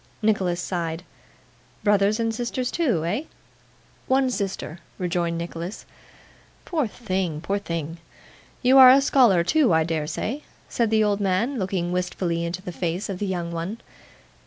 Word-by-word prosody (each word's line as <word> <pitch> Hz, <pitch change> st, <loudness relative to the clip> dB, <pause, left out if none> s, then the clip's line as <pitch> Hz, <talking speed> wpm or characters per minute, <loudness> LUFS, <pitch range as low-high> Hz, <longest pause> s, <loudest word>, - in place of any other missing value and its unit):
Nicholas 190 Hz, -5 st, +1 dB
sighed. 170 Hz, -2 st, -3 dB, 0.8 s
'Brothers 205 Hz, +1 st, +3 dB
and 225 Hz, -1 st, 0 dB
sisters 245 Hz, +2 st, -2 dB
too? 240 Hz, -, 0 dB
Eh?' 210 Hz, -, -1 dB, 0.8 s
'One 260 Hz, 0 st, +2 dB
sister,' 195 Hz, -6 st, -4 dB, 0.2 s
rejoined 175 Hz, -2 st, -1 dB
Nicholas. 170 Hz, +3 st, -6 dB, 0.8 s
'Poor 310 Hz, -8 st, 0 dB
thing, 185 Hz, -8 st, -3 dB
poor 200 Hz, +5 st, -2 dB
thing! 170 Hz, -3 st, -5 dB, 0.6 s
You 260 Hz, +2 st, +6 dB
are 260 Hz, -1 st, +11 dB
a 265 Hz, +2 st, +8 dB
scholar 245 Hz, -10 st, +4 dB
too, 285 Hz, -, +3 dB
I 160 Hz, -, +3 dB
dare 155 Hz, -2 st, -2 dB
say?' 235 Hz, -, -3 dB, 0.3 s
said 235 Hz, -2 st, 0 dB
the 220 Hz, 0 st, +3 dB
old 205 Hz, -1 st, +1 dB
man, 205 Hz, +7 st, 0 dB
looking 185 Hz, -2 st, -2 dB
wistfully 180 Hz, -1 st, -1 dB
into 175 Hz, +2 st, -4 dB
the 180 Hz, -, -5 dB
face 175 Hz, +3 st, -3 dB
of 190 Hz, -2 st, -4 dB
the 205 Hz, -, -2 dB
young 175 Hz, -2 st, -3 dB
one. 170 Hz, +6 st, -4 dB
190 Hz, 150 wpm, -24 LUFS, 170-225 Hz, 0.8 s, are